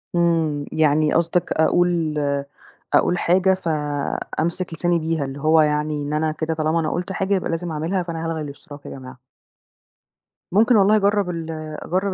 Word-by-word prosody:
إمم. 165 Hz, -4 st, +1 dB
يعني 155 Hz, -1 st, +2 dB
قصدك 170 Hz, +1 st, +1 dB
أقول 165 Hz, -1 st, +2 dB, 0.8 s
أقول 180 Hz, -, +3 dB
حاجة، 185 Hz, +2 st, +3 dB
فأمسك 160 Hz, +1 st, -2 dB
لساني 170 Hz, +1 st, +1 dB
بيها، 160 Hz, -2 st, -1 dB
اللي 135 Hz, +1 st, -7 dB
هو 155 Hz, +2 st, +4 dB
يعني 150 Hz, 0 st, 0 dB
إن 145 Hz, +1 st, -4 dB
أنا 155 Hz, +1 st, +1 dB
كده 160 Hz, +1 st, -2 dB
طالما 160 Hz, +1 st, 0 dB
أنا 155 Hz, -2 st, -1 dB
قُلت 180 Hz, +2 st, -3 dB
حاجة 195 Hz, 0 st, -1 dB
يبقى 185 Hz, -, -2 dB
لازم 165 Hz, +1 st, -3 dB
أعملها، 165 Hz, +5 st, -1 dB
فأنا 165 Hz, -1 st, -5 dB
هالغي 165 Hz, -1 st, -2 dB
الاشتراك 145 Hz, 0 st, -10 dB
يا -, -, -7 dB
جماعة. 130 Hz, -1 st, -10 dB, 1.3 s
ممكن 225 Hz, +6 st, +4 dB
والله 205 Hz, +1 st, +5 dB
أجرّب 205 Hz, -2 st, +2 dB
ال 165 Hz, -2 st, -4 dB, 0.3 s
أجرّب 190 Hz, +2 st, -1 dB
165 Hz, 160 wpm, -22 LUFS, 155-180 Hz, 1.3 s, والله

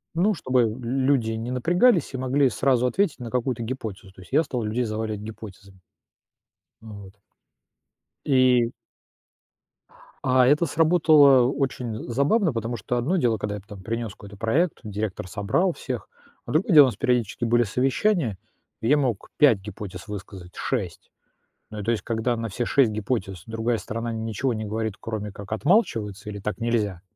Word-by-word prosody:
Ну, 195 Hz, +4 st, +2 dB
чтобы 125 Hz, -5 st, +1 dB
люди 130 Hz, -1 st, +1 dB
не 115 Hz, +2 st, -4 dB
напрягались 175 Hz, -, +2 dB
и -, -, -3 dB
могли 130 Hz, +2 st, +2 dB
сразу 125 Hz, 0 st, +1 dB
ответить 160 Hz, -, 0 dB
на 120 Hz, -2 st, -7 dB
какую-то 125 Hz, -1 st, -1 dB
гипотезу, 110 Hz, -6 st, -6 dB
то 95 Hz, -, -15 dB
есть 85 Hz, -, -16 dB
я 160 Hz, -, +4 dB
стал 125 Hz, -4 st, -3 dB
людей 110 Hz, +4 st, -1 dB
заваливать 110 Hz, -1 st, -3 dB
гипотезами. 100 Hz, -3 st, -11 dB, 1.0 s
Вот. 100 Hz, -3 st, -11 dB, 1.1 s
И 125 Hz, -3 st, +4 dB, 1.6 s
А 130 Hz, -1 st, +4 dB
это 150 Hz, +5 st, +4 dB
сработало 150 Hz, -5 st, +5 dB
очень 125 Hz, -5 st, -3 dB
забавно, 145 Hz, -, +2 dB
потому 115 Hz, +1 st, -3 dB
что 120 Hz, +4 st, -2 dB
одно 155 Hz, +11 st, 0 dB
дело, 115 Hz, -7 st, +2 dB
когда 105 Hz, 0 st, -3 dB
я 100 Hz, -, -7 dB
там 100 Hz, -4 st, -10 dB
принес 115 Hz, 0 st, -3 dB
какой-то 100 Hz, 0 st, -13 dB
проект, 145 Hz, -, 0 dB
директор 105 Hz, -3 st, -4 dB
собрал 110 Hz, -, 0 dB
всех, 125 Hz, -3 st, -5 dB, 0.4 s
а 120 Hz, -, -5 dB
другое 175 Hz, +3 st, +2 dB
дело, 145 Hz, -3 st, +10 dB
нас 125 Hz, -, -2 dB
периодически 120 Hz, -1 st, 0 dB
были 120 Hz, +1 st, +3 dB
совещания, 130 Hz, -, 0 dB, 0.4 s
и 110 Hz, -, -3 dB
я 145 Hz, -, +5 dB
мог 125 Hz, -8 st, -1 dB
5 135 Hz, -9 st, +5 dB
гипотез 95 Hz, -1 st, -8 dB
высказать, 95 Hz, -3 st, -9 dB
6. 100 Hz, -11 st, -4 dB, 0.6 s
Ну, 105 Hz, -1 st, -6 dB
то 115 Hz, -, 0 dB
есть 115 Hz, -, -1 dB
когда 115 Hz, +1 st, -1 dB
на 115 Hz, -1 st, -3 dB
все 120 Hz, +5 st, -3 dB
6 135 Hz, -5 st, +3 dB
гипотез 100 Hz, -4 st, -3 dB
другая 115 Hz, +1 st, -1 dB
сторона 115 Hz, +2 st, -4 dB
ничего 115 Hz, +3 st, -2 dB
не 110 Hz, 0 st, -4 dB
говорит, 110 Hz, 0 st, -3 dB
кроме 105 Hz, -2 st, -5 dB
как 100 Hz, +1 st, -11 dB
отмалчивается, 110 Hz, -, +1 dB
или 100 Hz, -1 st, -6 dB
"так 105 Hz, +2 st, -4 dB
нельзя", 105 Hz, -6 st, -1 dB
115 Hz, 160 wpm, -24 LUFS, 105-130 Hz, 1.6 s, дело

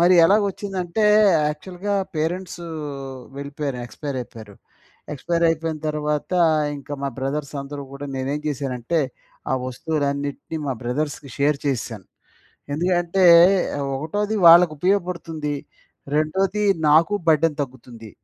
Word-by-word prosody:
మరి 180 Hz, +2 st, +6 dB
ఎలాగ 205 Hz, +4 st, +5 dB
ఒచ్చిందంటే, 195 Hz, 0 st, -3 dB, 0.5 s
యాక్చువల్‌గా 185 Hz, +6 st, -4 dB, 0.2 s
పేరెంట్స్ 175 Hz, +3 st, -3 dB, 0.8 s
వెళ్ళిపోయారు 140 Hz, -2 st, -4 dB
ఎక్స్పైర్ 140 Hz, +4 st, -6 dB
అయిపోయారు. 110 Hz, -4 st, -10 dB, 0.6 s
ఎక్స్‌పైర్ 170 Hz, +4 st, -1 dB
అయిపోయిన 160 Hz, -1 st, -1 dB
తర్వాత, 150 Hz, +1 st, -2 dB, 0.5 s
ఇంక 140 Hz, -, -13 dB
మా 140 Hz, -, 0 dB
బ్రదర్స్ 140 Hz, +2 st, -3 dB
అందరూ 140 Hz, 0 st, -7 dB
గూడా 140 Hz, +1 st, -7 dB
నేనేం 135 Hz, +3 st, -2 dB
జేశానంటే, 140 Hz, +1 st, -1 dB, 0.5 s
ఆ -, -, +3 dB
వస్తువులన్నిటిని 140 Hz, +2 st, -3 dB
మా 135 Hz, -, 0 dB
బ్రదర్స్‌కి 140 Hz, +2 st, -3 dB
షేర్ 145 Hz, +1 st, +2 dB
చేసేశాను. 115 Hz, -7 st, -3 dB, 0.7 s
ఎందుకంటే 175 Hz, +2 st, +1 dB, 0.7 s
ఒకటోది 205 Hz, +9 st, -2 dB
వాళ్ళకి 170 Hz, -1 st, +8 dB
ఉపయోగపడుతుంది. 170 Hz, -4 st, -1 dB, 0.6 s
రెండోది 190 Hz, +7 st, +1 dB, 0.3 s
నాకు 165 Hz, +7 st, +5 dB
బర్డెన్ 155 Hz, 0 st, +3 dB
తగ్గుతుంది. 120 Hz, -4 st, -10 dB
150 Hz, 105 wpm, -22 LUFS, 140-175 Hz, 0.8 s, వాళ్ళకి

